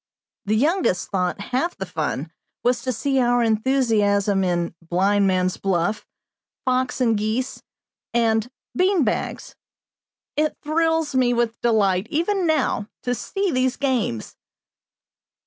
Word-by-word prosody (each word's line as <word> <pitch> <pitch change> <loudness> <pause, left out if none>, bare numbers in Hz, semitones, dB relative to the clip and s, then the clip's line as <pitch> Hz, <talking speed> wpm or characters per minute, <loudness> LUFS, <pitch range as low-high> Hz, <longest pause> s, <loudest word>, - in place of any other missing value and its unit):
The 210 +2 +1
youngest 290 - +1
thought 180 -1 0
half 255 +11 -2
the 190 - -4
fun 160 -3 -3 0.3
was 245 0 +2
to 255 - -1
see 265 +4 0
our 245 -1 +3
enthusiasm 215 -4 +2
in 175 -2 0
"blindman's 185 +1 +2
buff," 190 +1 -1 0.6
"fox 255 0 0
and 230 -3 +3
geese," 215 +5 -2 0.5
and 225 -1 +1 0.3
"bean 370 -2 +3
bags." 215 - -3 0.8
It 305 +1 0
thrills 325 0 +1
me 255 -2 +3
with 235 -1 -1
delight, 205 -4 +2
even 350 +3 0
now, 280 -9 +1 0.2
to 245 - 0
see 390 - -2
these 255 -2 +1
games! 245 - -1
235 Hz, 120 wpm, -23 LUFS, 200-265 Hz, 0.8 s, our